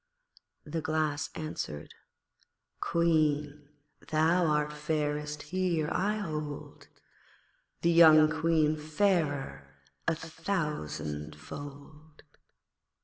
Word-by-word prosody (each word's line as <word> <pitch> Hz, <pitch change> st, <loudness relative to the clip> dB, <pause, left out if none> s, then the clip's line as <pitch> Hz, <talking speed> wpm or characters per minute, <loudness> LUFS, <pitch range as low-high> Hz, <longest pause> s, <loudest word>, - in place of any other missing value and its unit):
The 165 Hz, -, -3 dB
Glass 155 Hz, -1 st, -1 dB
answered 155 Hz, -, -5 dB, 0.9 s
'Queen, 150 Hz, -3 st, +1 dB, 0.4 s
thou 160 Hz, +3 st, +3 dB
art 150 Hz, 0 st, +1 dB
fairest 150 Hz, -1 st, -2 dB
here, 170 Hz, -1 st, 0 dB
I 205 Hz, +3 st, +1 dB
hold, 155 Hz, -7 st, -5 dB, 1.0 s
The 170 Hz, -, +4 dB
young 160 Hz, -2 st, +8 dB
Queen 160 Hz, -1 st, +2 dB
fairer 150 Hz, -, -1 dB, 0.3 s
a 165 Hz, -, +3 dB
thousandfold.' 145 Hz, -, -5 dB
155 Hz, 75 wpm, -30 LUFS, 145-165 Hz, 1.0 s, young